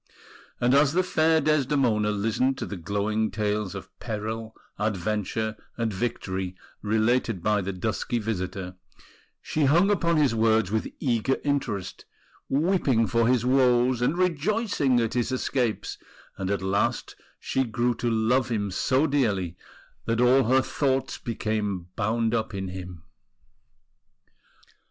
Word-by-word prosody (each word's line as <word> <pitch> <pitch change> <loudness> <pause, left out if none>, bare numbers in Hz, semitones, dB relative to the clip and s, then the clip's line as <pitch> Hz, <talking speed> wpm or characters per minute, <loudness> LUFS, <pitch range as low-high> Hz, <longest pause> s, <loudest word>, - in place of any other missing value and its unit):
And 120 +1 +3
as 140 +1 +4
the 185 +2 +3
fair 160 -2 +3
Desdemona 135 -8 +2
listened 115 +6 0
to - - -3
the 100 - -6
glowing 105 +4 -1
tales 105 -3 -2
of - - -9
peril, 110 +1 -5 0.2
adventure, 110 +2 -1 0.2
and 115 -3 -1
victory 95 -3 -3 0.3
related 110 -2 +1
by 105 -1 +2
the 95 +1 -3
dusky 110 +5 -2
visitor, 95 -4 -4 0.7
she 155 -2 0
hung 170 +9 +4
upon 170 -4 +2
his 145 -6 +3
words 110 -3 +2
with 110 0 0
eager 125 0 +1
interest, 135 -10 -2 0.4
weeping 140 -6 +2
for 115 +1 +2
his 125 -1 +2
woes 125 -1 +3
and 145 +7 +1
rejoicing 180 - +1
at 115 0 -1
his 120 0 0
escapes; 125 -3 -1 0.4
and 95 -1 -4
at 100 -1 -1
last 100 +5 0 0.2
she 135 - 0
grew 120 +1 0
to 120 +1 -2
love 120 +3 +2
him 105 -4 -1
so 130 +9 +2
dearly 105 - 0 0.5
that 115 0 0
all 125 +2 +5
her 130 +3 +4
thoughts 135 -2 -1
became 105 -6 -3
bound 115 +1 0
up 110 -2 -1
in 95 -1 -4
him. 90 -3 -8
115 Hz, 135 wpm, -26 LUFS, 105-130 Hz, 0.7 s, all